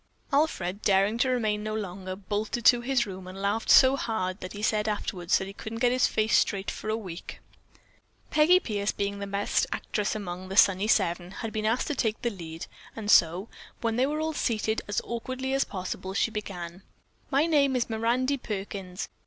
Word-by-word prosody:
Alfred, 205 - +1
daring 200 +3 +3
to 260 - +3
remain 215 -4 0
no 215 0 -3
longer, 190 -2 -5
bolted 210 +4 -3
to 240 -1 +7
his 250 -1 +1
room 190 -2 -8
and 185 +1 -8
laughed 205 +3 -1
so 265 0 +8
hard 200 -7 -2
that 185 - -7
he 205 0 -7
said 215 -1 +1
afterwards 185 -4 0
that 190 - -3
he 195 - -8
couldn't 220 +2 -7
get 245 +1 +3
his 255 0 +3
face 215 0 +1
straight 195 -1 +1
for 215 - -6
a 220 - +1
week. 185 -6 -8 0.9
Peggy 310 +4 +6
Pierce, 205 - -1
being 200 0 -3
the 200 - -4
best 200 +1 0
actress 210 0 -2
among 185 -2 -6
"The 195 - -4
Sunny 195 0 +5
Seven," 175 -4 +1 0.2
had 220 - -5
been 215 0 -1
asked 230 +3 +1
to 295 - -2
take 220 -4 0
the 235 - +1
lead, 165 -4 -7 0.3
and 215 -2 -1
so, 175 +5 +4 0.3
when 230 -1 0
they 255 +3 +2
were 305 +2 -2
all 315 0 -1
seated 220 -5 0
as 205 - -1
awkwardly 255 +3 -4
as 275 - +2
possible, 190 0 -5
she 225 - +1
began: 185 -4 -6 0.5
"My 285 +2 +3
name 285 -5 +3
is 245 - +1
Mirandy 240 +5 0
Perkins. 195 -4 -5
210 Hz, 195 wpm, -27 LUFS, 190-240 Hz, 0.9 s, so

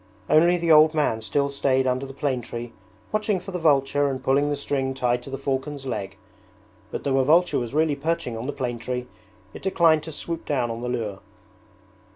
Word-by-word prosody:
Only 170 +3 +5
the 170 -1 +1
old 155 +1 +7
man 130 -7 +1
still 140 +7 0
stayed 135 -1 +1
under 130 +1 0
the - - -8
plane 135 -2 -1
tree 120 0 -7 0.4
watching 215 -2 0
for 195 +2 -9
the 180 - -3
vulture 145 -2 +3
and 130 -1 -4
pulling 140 +3 +2
the 145 - 0
string 135 -2 -2
tied 125 -2 0
to 125 - -10
the 135 - -4
falcon's 135 +1 -3
leg, 105 -7 -4 0.7
but - - -5
though 135 -1 +2
a - - +4
vulture 170 +6 +4
was 120 +2 -5
really 155 -1 +2
perching 140 -5 -2
on 115 +3 -5
the - - -1
plane 125 -4 -3
tree 125 +1 -3 0.5
it - - -9
declined 170 -5 +3
to 160 +1 -8
swoop 165 +2 -4
down 125 -5 0
on 115 +1 -5
the 125 - -3
lure. 110 -5 -3
135 Hz, 205 wpm, -24 LUFS, 125-155 Hz, 0.7 s, old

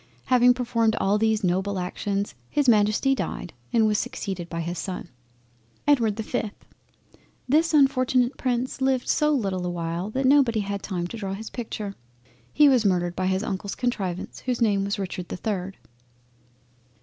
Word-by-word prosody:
Having 250 -1 +5
performed 230 -3 +1
all 200 +2 +2
these 220 -1 +1
noble 190 +2 0
actions, 195 +2 -2 0.2
his 290 -2 +1
Majesty 215 +4 +4
died, 180 -8 -4 0.2
and 225 -2 +4
was 210 -1 +2
succeeded 180 -3 -4
by 165 - -4
his 170 +1 -4
son. 180 -2 -5 0.8
EDWARD 235 -8 +3
the 220 - -4
5th 215 -1 -3 0.9
This 315 +5 +3
unfortunate 260 -3 +3
Prince 255 +1 -2
lived 265 -1 +1
so 300 - +2
little 195 -10 0
a 180 - -2
while 170 +2 -3
that 265 +4 -1
nobody 260 -5 +4
had 200 0 -4
him 180 -3 -3
to 205 +6 -6
draw 195 -3 -4
his 220 +2 -8
picture. 215 -4 -5 0.6
He 295 0 +6
was 255 -5 +4
murdered 175 -3 +1
by 185 0 -1
his 190 +2 0
Uncle's 200 -1 -4
Contrivance, 195 -8 -3
whose 250 -2 -2
name 205 -4 +2
was 200 0 -2
Richard 185 -2 -4
the - - -4
3rd. 195 -2 -3
210 Hz, 165 wpm, -25 LUFS, 190-245 Hz, 0.9 s, He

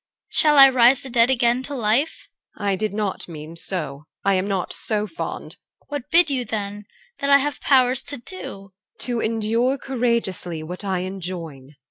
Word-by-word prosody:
Shall 300 -1 +4
I 275 - +11
raise 255 -1 +5
the 265 - -7
dead 235 0 +4
again 245 -1 +2
to 280 +2 -5
life? 240 +6 0 0.3
EL. 205 - -4
I 200 -1 +2
did 215 +3 -2
not 205 -1 -3
mean 160 -1 -9
so. 150 -5 -5 0.2
I 200 - +3
am 185 +1 0
not 195 -3 -2
so 210 -1 -2
fond. 325 - -6
CHR. - - -40
What 290 -4 -5
bid 335 -2 +4
you 260 -2 0
then 205 -2 -5 0.3
that 280 - -1
I 280 - +8
have 285 +1 -2
power 255 -3 +4
to 285 +2 +1
do? 370 +10 -7
EL. 195 -1 -9 0.3
To 240 -2 -2
endure 230 +4 0
courageously 235 - -2
what 180 +5 -7
I 190 -2 -1
enjoin. 170 -7 -7
220 Hz, 185 wpm, -22 LUFS, 190-260 Hz, 0.3 s, I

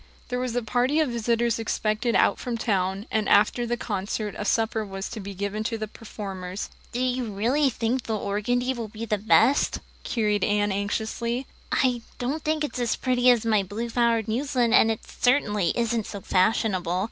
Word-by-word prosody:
There 250 -1 -1
was 250 -2 -2
a 245 - 0
party 250 +6 +1
of 310 -4 +2
visitors 235 0 0
expected 220 +1 0
out - - +3
from 240 -2 -3
town, 195 -3 0
and 215 -2 0
after 235 +4 +4
the 240 +1 -1
concert 205 0 -3
a - - -4
supper 220 +1 +1
was 195 -1 -5
to - - -6
be 200 -1 -7
given 205 +2 -3
to 225 0 -1
the 215 0 -4
performers. 195 -3 -6 0.2
"Do 240 - -3
you 255 0 0
really 235 +8 +1
think 240 +2 -1
the 220 -1 -1
organdy 245 +6 0
will 235 -3 -5
be 220 +2 -6
best?" 220 +6 +3 0.3
queried 210 -4 0
Anne 205 0 +2
anxiously. 220 +5 -2 0.3
"I 250 -3 +2 0.2
don't 275 +6 -2
think 310 0 0
it's 285 -3 -3
as 240 -2 +1
pretty 250 -1 +2
as 240 -2 +4
my 215 -2 +3
blue 210 +5 -4
flowered 230 -2 +2
muslin 245 0 +1
and 225 - +6
it 220 - -1
certainly 210 - +2
isn't 235 -2 0
so 200 - -6
fashionable." 185 -2 +1
225 Hz, 180 wpm, -25 LUFS, 205-245 Hz, 0.3 s, and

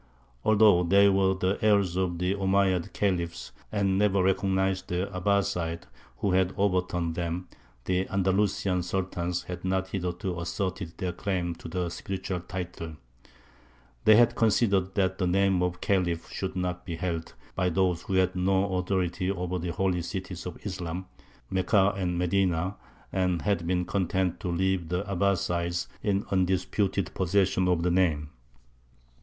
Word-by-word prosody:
Although 105 -5 +5
they 100 +3 +6
were 95 -1 +3
the 95 +1 0
heirs 100 -5 +3
of 90 -2 0
the 90 +2 0
Omeyyad 95 -2 +1
Khalifs, 85 -4 -1 0.2
and 100 -2 +1
never 100 -2 +3
recognized 95 0 +1
the 90 +2 -1
Abbāsides 90 -3 0 0.3
who 100 - 0
had 95 0 +2
overturned 90 -4 0
them, 85 +1 -3 0.4
the 95 +1 0
Andalusian 95 -1 +1
Sultans 90 -1 -2
had 90 - -7
not 95 0 0
hitherto 90 -1 -3
asserted 90 -1 -3
their 90 -3 -2
claim 90 -1 -2
to 85 - -10
the 90 +1 -2
spiritual 95 +1 -4
title: 85 -3 -6 1.1
they 110 - +8
had 120 +1 +5
considered 100 -4 +2
that 95 -1 +1
the 90 - +1
name 95 0 +2
of 90 0 -1
Khalif 90 -4 0
should 95 -1 -4
not 90 -1 -2
be 85 - -5
held 80 -3 -4 0.2
by 90 -1 +1
those 90 -1 +1
who 95 - -3
had 95 0 +2
no 95 +1 +1
authority 90 0 -1
over 90 -1 -2
the 85 +1 -3
Holy 90 0 0
Cities 90 0 -5
of 90 - -7
Islam, 90 -2 -4 0.5
Mekka 95 +1 +3
and 90 -3 -1
Medina, 90 0 +1 0.4
and 90 -3 0
had 95 -5 0
been 90 0 +1
content 95 -2 0
to - - -5
leave 90 -1 0
the 90 +2 -1
Abbāsides 90 -3 0 0.2
in 100 -1 0
undisputed 95 +1 0
possession 95 0 +2
of 90 -2 +2
the 90 - +2
name. 80 -5 +1
95 Hz, 150 wpm, -28 LUFS, 90-95 Hz, 1.1 s, they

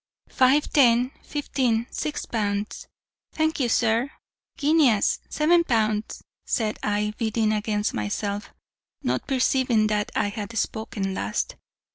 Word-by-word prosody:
"'Five 265 +3 +3
ten 250 -2 +4
fifteen 255 -6 -1
six 305 - -3
pounds 205 -2 -3 0.5
thank 315 0 0
you, 250 -3 +1
sir 230 +3 +2 0.5
guineas' 290 -8 +3
seven 340 +3 +3
pounds,' 220 -5 0 0.2
said 215 -2 -1
I, 210 0 0
bidding 220 -1 +1
against 210 0 -1
myself, 200 - -3 0.5
not - - -1
perceiving 255 -4 +2
that 210 0 -1
I 205 - +1
had 215 +1 -6
spoken 205 -3 -2
last. - - -2
225 Hz, 115 wpm, -25 LUFS, 210-265 Hz, 0.5 s, ten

